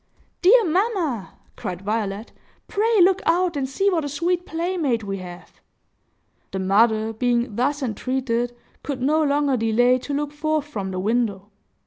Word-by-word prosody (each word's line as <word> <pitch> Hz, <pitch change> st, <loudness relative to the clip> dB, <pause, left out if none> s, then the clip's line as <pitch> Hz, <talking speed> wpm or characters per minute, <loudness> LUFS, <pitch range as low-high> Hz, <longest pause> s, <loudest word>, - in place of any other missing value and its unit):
"Dear 445 Hz, +5 st, +6 dB
mamma!" 345 Hz, -, -1 dB, 0.2 s
cried 180 Hz, +1 st, -6 dB
Violet, 210 Hz, 0 st, -3 dB, 0.4 s
"pray 440 Hz, +1 st, +2 dB
look 380 Hz, +1 st, +3 dB
out 345 Hz, 0 st, +2 dB
and 270 Hz, -2 st, -2 dB
see 390 Hz, +9 st, 0 dB
what 330 Hz, -4 st, 0 dB
a 290 Hz, -, -3 dB
sweet 345 Hz, +5 st, -1 dB
playmate 325 Hz, -8 st, -1 dB
we 195 Hz, -1 st, -4 dB
have!" 175 Hz, -1 st, -11 dB, 0.9 s
The -, -, -5 dB
mother, 220 Hz, +3 st, +2 dB
being 240 Hz, 0 st, 0 dB
thus 280 Hz, +5 st, 0 dB
entreated, 245 Hz, 0 st, -2 dB, 0.3 s
could 280 Hz, -3 st, -4 dB
no 300 Hz, +5 st, +2 dB
longer 285 Hz, -2 st, +2 dB
delay 245 Hz, +3 st, +3 dB
to 285 Hz, -, -7 dB
look 290 Hz, 0 st, -2 dB
forth 305 Hz, 0 st, -1 dB
from 205 Hz, -10 st, -5 dB
the 185 Hz, -1 st, -4 dB
window. 210 Hz, -1 st, -1 dB
260 Hz, 150 wpm, -23 LUFS, 220-315 Hz, 0.9 s, Dear